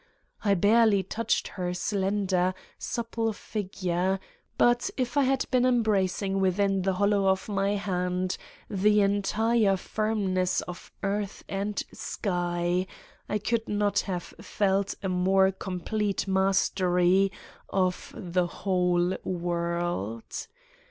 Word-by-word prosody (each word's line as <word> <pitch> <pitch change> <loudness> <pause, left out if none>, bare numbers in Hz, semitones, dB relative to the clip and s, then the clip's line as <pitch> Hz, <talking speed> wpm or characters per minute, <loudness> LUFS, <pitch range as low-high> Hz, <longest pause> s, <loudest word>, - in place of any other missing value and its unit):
I 200 -2 +3
barely 205 +1 +4
touched 230 +4 -1
her 180 -2 -3
slender, 190 -2 0 0.2
supple 230 -1 -2
figure, 190 -3 -2 0.4
but 240 0 +3
if 255 0 -1
I 285 -2 +4
had 265 0 +1
been 250 -2 +3
embracing 200 -5 +1
within 195 +1 +2
the 190 +1 +1
hollow 200 +1 +2
of 190 0 +1
my 200 0 0
hand 180 -2 -1 0.3
the 210 +2 +3
entire 205 +1 +2
firmness 195 -3 0
of 180 0 -9
earth 200 +1 -2
and 200 +1 -2
sky 175 -1 -1 0.4
I 210 - +1
could 225 +2 -1
not 205 -1 +1
have 180 -3 -4
felt 195 -1 0
a - - 0
more 190 +1 +3
complete 195 +2 -2
mastery 190 -1 +3 0.4
of 185 -2 0
the 180 -2 0
whole 180 -1 +1
world! 170 - -2
195 Hz, 110 wpm, -27 LUFS, 180-210 Hz, 0.4 s, barely